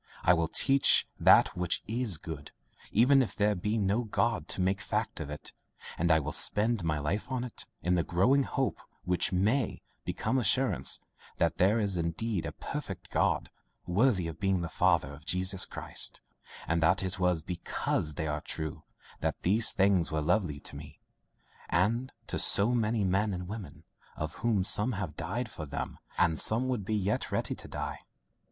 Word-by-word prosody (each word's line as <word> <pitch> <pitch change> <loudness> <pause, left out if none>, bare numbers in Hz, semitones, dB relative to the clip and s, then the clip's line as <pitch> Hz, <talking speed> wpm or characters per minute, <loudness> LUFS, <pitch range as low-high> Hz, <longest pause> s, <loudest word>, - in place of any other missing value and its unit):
I 90 - +6
will 85 -1 +1
teach 135 - +4
that - - +6
which 90 -1 -1
IS 110 -5 0
good, 75 -2 -8 0.4
even 130 +5 +5
if 125 - -2
there 105 0 +2
should 95 -4 -4
be 105 +3 0
no 105 +3 +1
God 110 -5 0
to - - -3
make 95 +1 +1
a - - -5
fact 105 -3 -2
of 80 -3 -5
it, 75 0 -7 0.4
and 85 +1 0
I 80 -1 +5
will 75 +1 -4
spend 110 +3 0
my 80 -2 0
life 85 - -3
on 130 -2 -1
it, 125 - -7 0.2
in 90 - +2
the 90 - +3
growing 110 - +3
hope, 135 0 -2 0.2
which 90 0 +1
MAY 105 +7 0 0.2
become 130 - -1
assurance, 110 - +2 0.4
that 85 - +1
there 100 +5 +3
is 100 -4 0
indeed 85 +4 -2
a - - -4
perfect - - -7
God, - - +1 0.3
worthy 95 0 +2
of 80 - -7
being 95 -3 +1
the 85 - -4
Father 70 - +2
of 70 +1 -13
Jesus 95 +1 +1
Christ, - - -3 0.5
and 85 0 +1
that 85 +4 +3
it 95 0 -2
was 90 -3 +1
BECAUSE 80 -3 -2
they 80 - -3
are 75 0 -2
true, 80 -2 -5 0.4
that - - -3
these 105 +6 +4
things 95 -4 +2
were 80 - 0
lovely 80 -1 0
to - - -9
me 75 +1 -11 0.7
and 115 +9 +1
to - - -2
so 105 +4 +6
many 110 -2 +1
men 95 +2 +1
and 90 0 -6
women, 105 -1 -8 0.3
of 80 +1 -4
whom 110 -5 +1
some 105 +6 +3
have 95 -7 -4
died 105 +10 -3
for 75 - -7
them, 70 +1 -5 0.2
and 80 -2 +2
some 115 +4 +3
would 125 -6 -1
be 110 - -1
yet 105 0 -1
ready - - -1
to - - -10
die." - - -5
95 Hz, 185 wpm, -30 LUFS, 85-110 Hz, 0.7 s, I